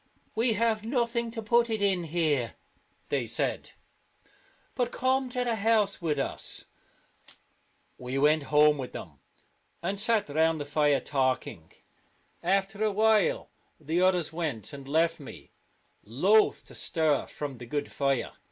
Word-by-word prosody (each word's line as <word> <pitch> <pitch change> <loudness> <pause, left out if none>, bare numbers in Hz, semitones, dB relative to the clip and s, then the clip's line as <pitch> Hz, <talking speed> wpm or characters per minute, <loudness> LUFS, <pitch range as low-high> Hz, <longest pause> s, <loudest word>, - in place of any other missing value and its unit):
" - - -38
We 225 +1 +2
have 220 0 +1
nothing 235 -1 -1
to 225 -1 -6
put 235 +2 +3
it 220 -1 -1
in 190 -4 +1
here," 150 -7 0 0.5
they 135 -5 -1
said, 115 - -1 0.5
" - - -33
but 245 -2 -1
come 260 0 0
to 250 0 -1
the 235 -2 -1
house 215 -2 +2
with 155 -3 0
us." 135 - -3 1.3
We 125 +2 -4
went 150 +2 +4
home 150 0 +5
with 130 - -6
them, 75 -7 -9 0.6
and 195 +3 -2
sat 220 -1 +1
round 160 +2 +2
the 145 - -4
fire 145 -1 +2
talking. 130 - -2 0.7
After 195 +3 0
a 215 - +2
while 215 -1 +2 0.3
the 160 +3 -1
others 180 -4 +2
went, 150 - -3
and 140 -1 -9
left 165 +3 +1
me, 140 - -11 0.5
loath 190 - +3
to - - -15
stir 155 -4 0
from 140 -4 -6
the 120 - -9
good 145 +3 -3
fire. 140 -3 0
170 Hz, 150 wpm, -28 LUFS, 145-220 Hz, 1.3 s, home